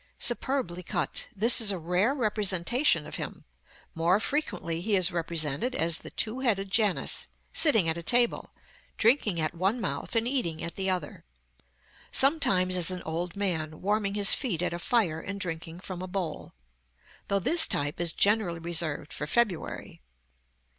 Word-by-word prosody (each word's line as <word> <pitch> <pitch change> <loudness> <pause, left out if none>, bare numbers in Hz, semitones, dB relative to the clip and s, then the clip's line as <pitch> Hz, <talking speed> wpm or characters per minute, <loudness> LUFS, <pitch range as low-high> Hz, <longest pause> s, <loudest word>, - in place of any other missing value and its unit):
_ - - -31
Superbly 240 -7 -1
cut. 180 - -1
This 230 +5 +5
is 210 -2 +1
a 195 - -3
rare 180 - +1
representation 210 - +1
of - - -7
him. - - -7 0.5
More 170 +4 +2
frequently 200 - -2
he 205 +2 +1
is 185 -1 +4
represented 165 - -1
as 165 0 +1
the - - -10
two 225 +4 0
headed 200 -7 0
Janus, 210 -3 +1 0.3
sitting 225 - +3
at 160 +1 0
a - - -6
table, 240 +7 +2 0.5
drinking 220 - +2
at 155 -1 0
one 190 +8 0
mouth 235 - -4
and 230 +1 +2
eating 175 - -1
at 170 - -5
the 190 -1 -1
other. 185 -1 -4 0.9
Sometimes 190 - +3
as 180 -1 +1
an 185 -1 -4
old 165 +2 -4
man, 160 -6 -2
warming 205 0 -1
his 205 -1 +6
feet 180 - -2
at 180 - -1
a 175 - -4
fire, 175 -6 +1
and 200 +4 -6
drinking 165 -2 -5
from 185 -1 -7
a 185 - -5
bowl; 180 -4 -5 0.7
though 200 - +1
this 320 - +5
type 145 +1 -1
is 170 -1 +2
generally 200 -4 +2
reserved 165 -3 -2
for 150 - -5
February. 205 - -2
185 Hz, 165 wpm, -28 LUFS, 170-220 Hz, 0.9 s, his